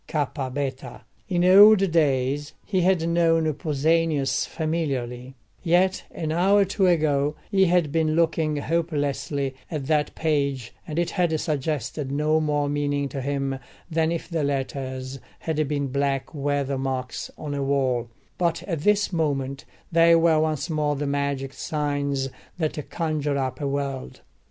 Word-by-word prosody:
ΚΒ′. 140 -2 -3 0.3
In 175 -1 +2
old 195 0 +7
days 145 -2 +1
he 190 -3 0
had 175 -2 +2
known 165 -2 +2
Pausanias 150 0 +1
familiarly; 135 -6 -3 0.3
yet 180 +3 +2
an 160 -2 -4
hour 190 +5 +4
or - - +4
two 195 0 +1
ago 150 -4 +2 0.2
he 195 -2 +4
had 175 -4 +2
been 155 0 +1
looking 160 -2 +1
hopelessly 145 -3 -1 0.2
at 150 -5 -4
that 150 0 0
page, 140 -6 -1
and 155 - -5
it 170 0 0
had 170 -4 +1
suggested 145 -3 -2
no 150 +2 +2
more 145 -1 0
meaning 145 -1 -1
to 135 - -5
him 135 0 -2 0.3
than 160 0 +1
if 170 -1 -3
the 165 -3 -1
letters 135 -1 -3 0.2
had 155 -2 -1
been 145 0 -1
black 135 +1 -1
weather 140 -2 -1
marks 130 -1 -3
on 150 -2 -5
a 140 - -2
wall; 130 -4 0 0.3
but 170 -2 0
at 165 -5 -3
this 210 +4 +2
moment 140 -4 -1 0.3
they 170 0 +6
were 165 -1 +4
once 155 -1 0
more 150 -3 0
the 145 +1 -3
magic 140 -1 -2
signs 145 -3 -2 0.3
that 155 -3 -3
conjure 150 -4 -1
up 130 0 -3
a 140 - -1
world. 140 -1 -4
150 Hz, 145 wpm, -24 LUFS, 140-165 Hz, 0.3 s, old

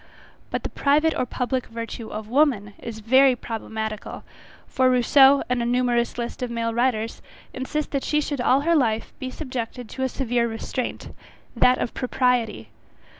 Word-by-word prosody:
But, - - -3
the - - -3
private 305 +3 +2
or 255 - -1
public 250 +1 -2
virtue 230 0 -6
of 215 0 -6
women 240 -6 +2
is 225 -2 -7
very 260 +4 +5
problematical; 220 -2 -5 0.4
for 260 0 +2
Rousseau, 265 +2 +5
and 250 -1 0
a - - -1
numerous 240 -1 +1
list 240 +2 -5
of 250 - -2
male 230 -1 -2
writers, 230 -2 0 0.3
insist 290 +4 -3
that 275 -2 -1
she 300 - +1
should 285 -3 -2
all 260 +2 +3
her 335 +3 +2
life, 225 -6 0
be 260 -2 -4
subjected 250 -4 -5
to 265 - -7
a 260 - +1
severe 245 -2 0
restraint, 235 +2 -5 0.4
that 250 0 +4
of - - -3
propriety. 245 - 0
250 Hz, 165 wpm, -24 LUFS, 230-265 Hz, 0.4 s, very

